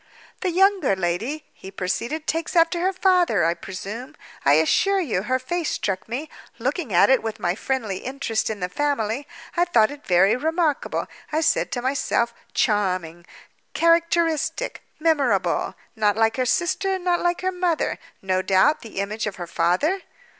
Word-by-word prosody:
"The 370 - -1
younger 370 - +3
lady," 210 - -2
he 190 - -11
proceeded, 230 +11 -3
"takes 330 +3 -2
after 335 +1 +4
her 370 +2 +1
father, 360 - +3
I 165 - +3
presume? 210 - -7 0.3
I 140 - +5
assure 385 - +3
you, 245 - -1
her 255 +6 0
face 325 +6 -2
struck 195 +1 -3
me. 270 +7 -3 0.3
Looking 260 - -2
at 175 +8 +5
it 265 - +4
with 220 -1 -5
my 175 0 0
friendly 220 -2 -2
interest 250 -2 -2
in 210 -3 -5
the 180 - 0
family, 275 +2 -1 0.3
I 345 - +3
thought 230 -10 +3
it 290 0 -10
very 185 +3 +4
remarkable. 320 +2 0 0.3
I 310 +1 +1
said 320 - +1
to 245 - -3
myself—Charming, 205 -9 -1 0.5
Characteristic, 335 -2 +1 0.2
Memorable. 265 - +1 0.2
Not 210 -1 +2
like 225 +1 +2
her 255 -1 +1
sister, 380 +4 +1
not 355 -1 0
like 350 0 0
her 370 0 0
mother. 355 -3 -1 0.2
No 185 -1 +1
doubt, 190 +11 +3
the 225 - -11
image 210 +2 -3
of 200 - -4
her 175 - -6
father?" 180 - +1
255 Hz, 160 wpm, -23 LUFS, -, 0.5 s, I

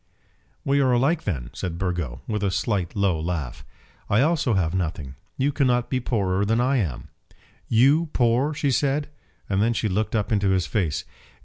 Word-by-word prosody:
"We 140 +1 +2
are 130 -2 +3
alike 140 +7 +1
then," 65 - -3
said 85 -2 -4
Burgo, 85 -9 -3
with 105 -2 -2
a 100 - +1
slight 95 -2 -1
low 100 -5 +1
laugh. 75 -7 -4 0.5
"I 105 +4 +4
also 145 -6 +2
have 85 -3 +1
nothing. 80 -7 -3 0.2
You 140 +2 +1
cannot 125 -4 +1
be 130 - +1
poorer 100 -6 0
than 110 +3 +1
I 130 +3 +2
am." 80 - -3 0.6
"You 140 +8 +4
poor!" 125 +4 +2
she 145 -1 0
said. 140 +3 0 0.4
And 95 0 +1
then 115 +2 +2
she 115 - -1
looked 105 +3 -1
up 105 -1 -1
into 100 -2 +2
his 95 -3 +2
face. 85 -4 -1
105 Hz, 180 wpm, -24 LUFS, 90-130 Hz, 0.6 s, I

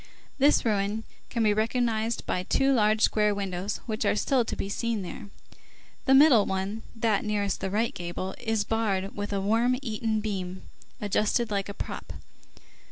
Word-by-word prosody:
This 285 0 +4
ruin 210 0 0 0.3
can 230 -2 0
be 210 -1 +4
recognized 225 +1 0
by 180 - -1
two 270 +8 +2
large 215 -2 +3
square 210 -1 +3
windows 195 0 -3
which 220 -2 -2
are 205 - +2
still 255 +3 +2
to - - -4
be - - -3
seen 220 0 -2
there; 195 +3 -8 0.8
the 265 - +5
middle 270 -7 +7
one, 195 +3 -2
that 225 -3 +1
nearest 205 -2 -1
the 195 - -1
right 220 +4 0
gable, 175 +2 -5
is 225 -3 0
barred 205 -3 -1
with 205 0 -4
a 200 - 0
worm 230 +5 +2
eaten 220 -2 -1
beam 190 -3 -4 0.4
adjusted 215 +2 +1
like 200 -1 -1
a 200 - -6
prop. - - -6
215 Hz, 165 wpm, -27 LUFS, 200-230 Hz, 0.8 s, middle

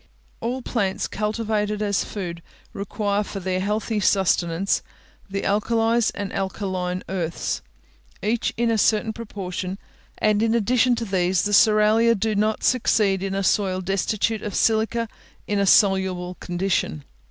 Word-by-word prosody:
All 250 +2 -3
plants 195 -6 -1
cultivated 210 0 -1
as 205 -2 0
food 175 -5 -6 0.3
require 205 +1 -1
for 200 - -6
their 185 0 -1
healthy 210 +2 -1
sustenance 185 -2 +2 0.5
the 195 0 -3
alkalies 225 +2 +2
and 200 -1 -4
alkaline 185 -2 -3
earths, 170 -3 -2 0.6
each 225 +2 0
in 235 0 +2
a 225 - +1
certain 220 +1 +2
proportion; 190 -4 -5 0.4
and 215 -1 +2
in 225 0 +2
addition 245 +2 +3
to 230 - -3
these, 185 -2 +1
the 205 - -1
cerealia 215 +2 +5
do 220 +1 0
not 215 +1 0
succeed 210 -6 +2
in 195 0 -2
a 195 - -1
soil 190 0 +1
destitute 195 +3 -1
of 205 - -5
silica 225 +1 +1 0.4
in 205 -1 -1
a 200 - +2
soluble 190 -3 +3
condition. 175 - -1
205 Hz, 140 wpm, -23 LUFS, 190-220 Hz, 0.6 s, cerealia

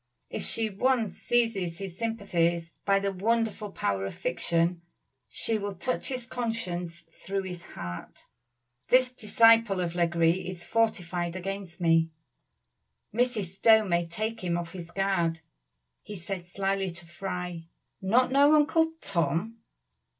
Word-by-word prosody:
If - - -3
she 225 -1 0
once 225 -1 +1
seizes 215 -8 +1
his 190 -2 -6
sympathies 175 -7 0
by 195 0 +4
the 200 0 -1
wonderful 215 +1 0
power 100 - -1
of - - -7
fiction, 170 0 0 0.5
she 215 +6 0
will 200 -1 -4
touch 255 +8 -2
his 255 -2 -4
conscience 185 -9 -3
through 195 +4 -5
his 180 -2 -7
heart. 90 0 -7 0.6
This 255 0 +4
disciple 225 -3 +4
of 175 -2 -1
Legree 170 +1 +2
is 175 -2 -7
fortified 180 -6 0
against 190 -1 -5
me; 165 -1 +3 1.0
Mrs. 220 -6 0
Stowe 220 0 +6
may 175 -2 +1
take 215 +5 -3
him 175 -1 0
off 170 -1 -5
his 175 -3 -7
guard. 170 -4 0 0.6
He 210 - -8
said 180 0 -5
slyly 195 +1 -1
to 175 0 -10
Fry, 180 -1 -5 0.4
'Not 240 +7 +3
know 285 +3 +6
Uncle 320 +2 +3
Tom! 185 +5 -1
190 Hz, 135 wpm, -28 LUFS, 170-225 Hz, 1.0 s, Stowe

